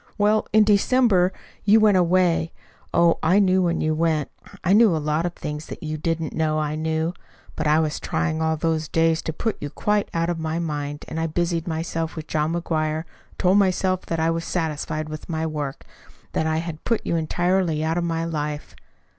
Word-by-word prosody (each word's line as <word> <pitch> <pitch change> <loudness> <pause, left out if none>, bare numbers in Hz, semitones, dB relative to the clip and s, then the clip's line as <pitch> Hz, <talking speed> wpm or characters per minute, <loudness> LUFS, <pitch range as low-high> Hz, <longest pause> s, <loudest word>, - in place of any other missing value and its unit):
"Well, 210 +1 +2
in 215 0 +6
December 205 -2 +3 0.3
you 210 +2 +6
went 215 -2 +5
away. 175 -2 +2 0.4
Oh, 170 -1 +3
I 175 +5 +3
knew 190 -2 +4
when 170 -2 0
you 155 0 +1
went. 155 -2 0 0.3
I 185 - +3
knew 215 -4 +6
a - - 0
lot 155 +2 0
of 175 - -7
things 150 +1 -6
that - - -8
YOU 155 0 -3
didn't 165 +1 -2
know 155 -1 0
I 150 -1 -1
knew. 160 +2 -1 0.4
But 155 - -1
I 150 +1 +4
was 155 -2 -1
trying 160 -2 -1
all 160 0 +1
those 160 -1 -1
days 165 0 +2
to - - -3
put 220 +7 -2
you 145 - -4
quite 210 +6 0
out 165 0 0
of 170 -1 -2
my 160 0 -2
mind, 145 -3 -4
and 160 - -4
I 165 - 0
busied 170 +1 -1
myself 165 0 -3
with 160 -2 -6
John 155 +1 -1
McGuire 160 -2 -1
and - - -28
told 190 +2 +4
myself 185 -1 +1
that 165 - -2
I 165 +1 +2
was 165 0 -2
satisfied 155 -2 -2
with 155 +2 -8
my 160 -1 -1
work; 150 -3 -4 0.5
that 160 - 0
I 160 0 +1
had 160 -1 -5
put 230 -2 0
you - - 0
entirely 175 0 +1
out 165 +2 0
of - - -1
my 165 -1 -1
life. 150 -2 -4
165 Hz, 205 wpm, -23 LUFS, 155-175 Hz, 0.5 s, in